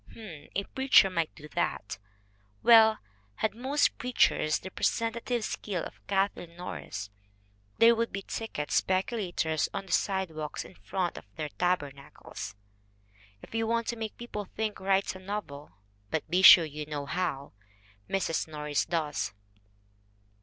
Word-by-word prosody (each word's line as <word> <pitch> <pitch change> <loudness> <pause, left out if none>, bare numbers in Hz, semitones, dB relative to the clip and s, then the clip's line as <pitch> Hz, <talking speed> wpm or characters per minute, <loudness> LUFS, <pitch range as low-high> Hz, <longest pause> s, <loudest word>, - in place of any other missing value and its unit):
H'm, 170 -10 -11
a 200 - +1
preacher 260 -5 +4
might 165 -3 -1
do 150 -1 -11
that. 100 -8 -2 0.6
Well, 220 -2 +7 0.4
had 220 - -1
most 265 +6 +1
preachers 240 -10 +2
the 190 - -9
pre - - -9
sentative 235 +1 0
skill 195 -5 -3
of - - -9
Kathleen 195 -4 -1
Norris 100 - -6 0.7
there 230 +1 +7
would 230 0 -1
be 195 0 -4
ticket 190 -11 -5
speculators 185 -5 0
on 195 -1 -3
the 190 - -10
sidewalks 165 -6 -1
in - - -13
front 185 -1 -3
of - - -19
their 155 -1 -4
taber 175 -4 0
nacles! 140 -7 -9 0.9
If - - -13
you 225 0 0
want 230 0 +1
to 235 - -1
make 220 -2 -5
people 210 -4 -5
think 215 +2 -4
write 195 +1 +1
a - - -8
novel 185 -7 -6 0.4
but 160 - -2
be 180 +2 +3
sure 175 -3 +10
you 150 0 -6
know 145 -2 -4
how! 140 -4 -3 0.6
Mrs. 185 -5 0
Norris 150 -2 -2
does. 155 - -2
190 Hz, 145 wpm, -29 LUFS, 155-220 Hz, 0.9 s, sure